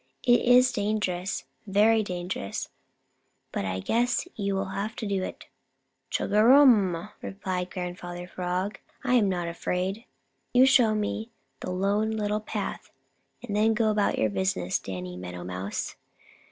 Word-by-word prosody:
It 245 -1 +5
is 250 +1 +6
dangerous, 200 -4 -1 0.2
very 215 +3 +4
dangerous, 180 - -4 0.8
but 100 - -2
I 95 0 -2
guess 240 - +1
you 200 -2 -1
will 195 0 -2
have 210 +4 -3
to 225 - -5
do 200 -2 0
it." - - -6 0.6
"Chugarum!" 215 -5 +4
replied 185 -2 -3
Grandfather 175 -1 -6
Frog, 180 +3 -3 0.2
"I'm 245 -6 +3
not 175 -2 -1
afraid. 185 +6 -2 0.5
You 255 +1 +8
show 245 -5 +5
me 215 +2 -2 0.3
the - - -5
Lone 200 +4 +1
Little 210 -1 -1
Path 210 -1 -4 0.5
and 205 - -4
then 220 +1 +3
go 220 -1 +2
about 210 -1 +1
your 110 -1 +1
business, 95 -2 0
Danny 90 -1 -6
Meadow 90 -1 -7
Mouse." 90 +3 -4
200 Hz, 135 wpm, -27 LUFS, 175-220 Hz, 0.8 s, You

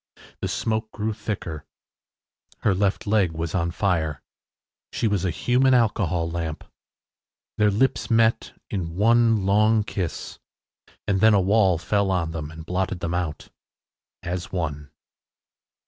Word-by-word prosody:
The - - -2
smoke 110 0 -2
grew 110 +1 -2
thicker. 90 -8 -5 1.0
Her 100 - +3
left 95 +1 0
leg 100 -5 +2
was 80 0 -4
on 85 -2 0
fire. 85 -6 -1 0.7
She 115 - 0
was 100 -4 0
a 95 - +1
human 130 +7 +2
alcohol 90 -8 +1
lamp. 80 -2 -4 1.0
Their 105 0 +5
lips 110 +7 +1
met 115 -1 +2 0.2
in 85 -4 -3
one 115 0 +3
long 105 +2 +3
kiss 95 -6 -5 0.7
and 95 -2 +1
then 110 -1 +6
a - - +5
wall 95 -2 +3
fell 100 +4 0
on 85 -4 0
them 80 -2 -5
and 80 0 -10
blotted 90 +1 -2
them 85 0 -3
out. 85 -4 -3 0.7
“AS 90 +1 -4
ONE. 75 -5 -3
95 Hz, 135 wpm, -24 LUFS, 85-110 Hz, 1.0 s, then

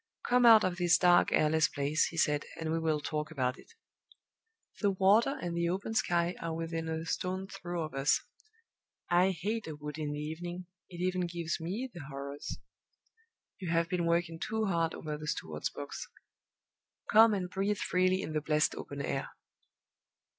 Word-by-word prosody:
"Come 245 0 +5
out 225 -2 +9
of 185 -1 0
this 175 -2 +4
dark, 175 -1 +5
airless 155 0 +3
place," 145 +2 +1
he 165 - -8
said, 150 -1 +2
"and 160 -1 -2
we 165 - +1
will 160 -2 0
talk 150 -1 -3
about 130 -5 -1
it. 460 - -17 1.1
The 205 - +3
water 200 +8 +3
and 175 -1 -3
the 170 0 +1
open 195 +5 -2
sky 175 -4 +1
are 165 -1 -3
within 165 0 -3
a 160 0 -3
stone's 185 +3 -3
throw 175 -2 -4
of 155 - -6
us. 135 +1 +2 0.9
I 180 +2 +5
hate 200 +4 -2
a 155 - -5
wood 150 +1 -7
in 150 -1 -2
the 145 - -4
evening; 175 +4 -5 0.2
it 175 -1 -8
even 185 -1 0
gives 170 -1 -3
me 195 +10 -3
the 170 -6 -8
horrors. 140 +1 -6 1.0
You 185 -3 -4
have 165 0 +1
been 175 -1 0
working 170 -1 0
too 220 +4 -1
hard 165 -4 0
over 150 -1 -5
the 155 - -7
steward's 80 - -3
books. - - -7 1.0
Come 220 0 +7
and 185 -2 -2
breathe 195 +3 -1
freely 185 +1 +1
in 155 - -5
the 155 - 0
blessed 150 +1 +2
open 140 0 -6
air." 135 - -2
170 Hz, 175 wpm, -31 LUFS, 155-185 Hz, 1.1 s, out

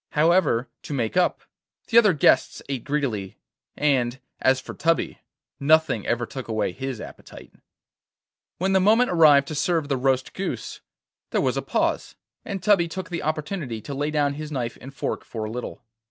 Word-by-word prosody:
However, 150 -6 +3
to 145 - -5
make 115 0 -1
up, 180 -1 +2 0.5
the 230 - +4
other 210 -5 +4
guests 150 - +3
ate 135 -4 -3
greedily, 130 -10 -2 0.4
and, 130 -4 +1 0.2
as 130 0 +3
for 130 - -9
Tubby, 165 +1 0 0.4
nothing 155 -6 +3
ever 120 0 0
took 130 +2 -7
away 110 -4 -1
his 135 +3 -5
appetite. - - -11 1.0
When 190 +2 0
the 190 - +5
moment 220 +6 +4
arrived 150 -5 +6
to - - -4
serve 155 +1 0
the 135 - +1
roast 130 0 0
goose, 195 - -5 0.5
there - - 0
was - - +1
a - - -1
pause, - - -1 0.3
and 195 -3 -5
Tubby 195 -5 +4
took 180 +1 -6
the 170 - -2
opportunity 155 - -3
to 140 - -7
lay 145 +2 -1
down 145 -2 +1
his 155 +1 -7
knife 120 -5 -3
and 135 - -9
fork 140 - -3
for 110 -2 -5
a 110 - -5
little. 125 +1 -6
145 Hz, 175 wpm, -24 LUFS, 130-165 Hz, 1.0 s, arrived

